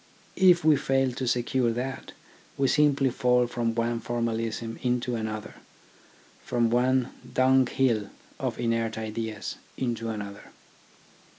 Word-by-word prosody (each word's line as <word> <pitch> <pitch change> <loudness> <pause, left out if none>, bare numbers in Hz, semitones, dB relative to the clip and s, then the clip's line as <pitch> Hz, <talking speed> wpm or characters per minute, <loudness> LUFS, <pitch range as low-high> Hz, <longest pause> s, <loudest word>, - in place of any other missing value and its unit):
If 175 -3 +6
we 155 -2 +6
fail 135 -1 +1
to 125 +1 -4
secure 120 0 +1
that, 130 +3 -5 0.4
we 135 - +2
simply 140 -2 +3
fall 125 0 +3
from 120 -1 -2
one 115 0 0
formalism 115 -1 -3
into 125 -1 0
another, 110 -1 -4 0.9
from 120 -2 +1
one 125 +1 +2 0.2
dung 130 0 +4
hill 115 -6 +1 0.3
of - - -3
inert 115 -1 0
ideas 110 -1 -4 0.2
into 115 -3 -2
another. 100 -2 -6
120 Hz, 120 wpm, -27 LUFS, 115-130 Hz, 0.9 s, If